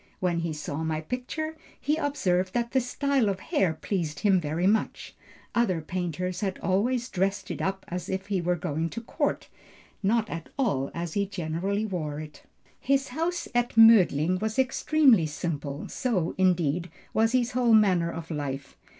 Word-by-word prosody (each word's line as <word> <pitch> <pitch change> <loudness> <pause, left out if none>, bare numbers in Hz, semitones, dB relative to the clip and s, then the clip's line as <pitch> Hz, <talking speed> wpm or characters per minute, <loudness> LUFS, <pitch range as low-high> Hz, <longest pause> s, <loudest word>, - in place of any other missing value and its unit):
When 175 -2 0
he 165 -1 -2
saw 150 0 -4
my 160 -1 -1
picture, 255 - -4 0.2
he 295 +3 +1
observed 185 - 0
that 235 -1 0
the 265 - +3
style 265 -1 +1
of 190 -1 -2
hair 180 -3 0
pleased 160 -4 -3
him 195 -3 +4
very 160 +3 -1
much; 215 +3 0 0.4
other 210 -8 +2
painters 180 +2 -3
had 190 -2 -1
always 235 +6 0
dressed 195 -2 -1
it - - -4
up 190 0 -2
as 180 0 -5
if 190 0 -2
he 200 -3 -1
were 175 +1 +1
going 160 0 -2
to 230 - -6
court, 230 - -2 0.5
not 220 +2 +2
at 165 -5 -6
all 140 - 0
as 170 -1 -4
he 200 -1 0
generally 190 +3 -2
wore 155 -7 -3
it." 155 -1 -9 0.4
"His 275 0 +1
house 330 +6 -2
at 240 -1 0
Mödling 185 -6 +6
was 220 +2 -2
extremely 265 - +4
simple; 145 -2 -4
so, 195 -10 -1
indeed, 175 -2 +1 0.2
was 225 +2 +2
his 245 -2 +2
whole 245 -2 +3
manner 185 -6 +3
of 165 0 -7
life. 140 -2 -4
185 Hz, 165 wpm, -27 LUFS, 165-230 Hz, 0.5 s, Mödling